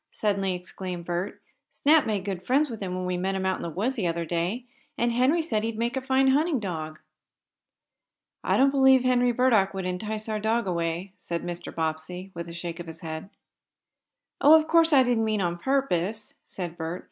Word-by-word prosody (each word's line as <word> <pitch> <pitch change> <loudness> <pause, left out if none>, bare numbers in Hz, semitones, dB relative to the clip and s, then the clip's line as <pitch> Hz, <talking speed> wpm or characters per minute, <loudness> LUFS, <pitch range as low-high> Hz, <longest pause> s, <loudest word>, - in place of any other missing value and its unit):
suddenly 195 -3 0
exclaimed 180 -1 -6
Bert. 175 +3 -3 0.3
"Snap 300 -1 +3
made 205 -3 -1
great 190 -3 -4
friends 270 +6 +2
with 225 - -7
him 185 -2 -3
when 185 0 -3
we 180 0 -1
met 190 +2 -1
him 190 0 -2
out 190 0 +1
in - - -9
the 170 - -4
woods 225 - -2
the 190 -6 0
other 170 0 -2
day, 175 +9 -2 0.3
and 235 0 +1
Henry 260 +8 +2
said 220 -9 -1
he'd 225 -1 -3
make 235 +3 -1
a 265 - -1
fine 265 0 +3
hunting 295 +1 +2
dog." 160 -6 -5 1.5
"I - - +2
don't 275 +1 +5
believe 265 -2 +5
Henry 245 -1 +3
Burdock 225 -6 +3
would 190 -1 -3
entice 210 +4 -3
our 215 -1 -2
dog 225 +2 0
away," 170 +1 -2
said 170 -1 -4
Mr. 175 0 -6
Bobbsey, 165 +4 -4
with 170 0 -6
a - - -7
shake 170 0 -6
of 175 - -7
his 165 0 -9
head. 160 +2 -6 1.1
"Oh, 315 +2 +9
of 310 - -4
course 330 0 +4
I 270 -3 +6
didn't 245 -3 +1
mean 215 -1 0
on 175 -2 -1
purpose," 220 -5 -1
said 175 -3 -6
Bert. 165 +2 -4
195 Hz, 205 wpm, -26 LUFS, 175-250 Hz, 1.5 s, Oh